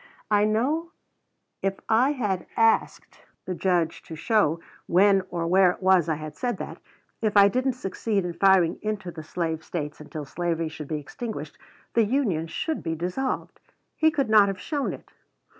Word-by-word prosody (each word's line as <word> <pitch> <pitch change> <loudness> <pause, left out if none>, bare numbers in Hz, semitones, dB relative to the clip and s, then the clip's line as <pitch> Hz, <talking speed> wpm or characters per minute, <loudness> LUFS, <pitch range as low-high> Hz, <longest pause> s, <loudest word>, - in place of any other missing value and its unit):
I 205 0 +4
know 290 - 0 0.7
if 195 0 -1
I 250 +6 +3
had 205 -9 -2
asked 225 0 +1 0.2
the 185 - -3
Judge 175 -3 0
to 160 - -9
show 170 -2 +2 0.3
when 195 +2 +5
or 170 -1 -2
where 185 +2 +5
it 180 - -3
was 185 -4 +4
I 160 - +1
had 155 0 -8
said 245 -1 -2
that, - - -7 0.4
if 215 -2 +1
I 200 0 +8
didn't 255 +4 0
succeed 205 -3 -2
in 175 - -3
firing 190 -2 +4
into 215 -4 -3
the 165 - -8
Slave 160 0 -3
States 150 -3 -5
until 150 0 -7
slavery 165 +1 -2
should 155 -2 -8
be 155 - -2
extinguished, 155 - -7 0.3
the 230 - +4
Union 205 - 0
should 315 - -3
be 160 - -2
dissolved, 180 +11 -3 0.4
he 315 - +4
could 280 -4 0
not 215 -2 +6
have 195 -1 -3
shown 290 - -2
it. - - -11
190 Hz, 175 wpm, -25 LUFS, 165-225 Hz, 0.7 s, I